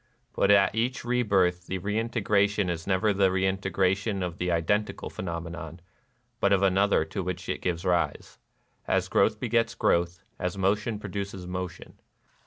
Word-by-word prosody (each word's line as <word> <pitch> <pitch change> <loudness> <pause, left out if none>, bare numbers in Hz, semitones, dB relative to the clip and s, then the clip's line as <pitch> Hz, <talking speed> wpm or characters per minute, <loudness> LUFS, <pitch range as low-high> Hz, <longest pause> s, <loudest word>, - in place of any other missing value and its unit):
But 100 - +2
at 100 -1 +5
each 120 +3 -1
rebirth 95 -8 +1
the 95 - -2
reintegration 105 -1 +1
is 85 0 -5
never 100 +2 +2
the 95 -1 +3
reintegration 95 +1 0
of 85 -2 -5
the 90 - -1
identical 95 +6 -1
phenomenon, 85 -1 -6 0.6
but 100 - +2
of 100 -1 +3
another 95 -3 +3
to 95 +5 -4
which 90 0 -4
it - - -3
gives 90 0 -2
rise, 90 -2 -1 0.2
— - - -43
as - - +1
growth - - +2
begets 115 -1 +1
growth, 85 0 +1 0.2
as 90 +1 -2
motion 105 +3 0
produces 100 -2 -5
motion. 90 0 -6
95 Hz, 150 wpm, -27 LUFS, 90-100 Hz, 0.6 s, at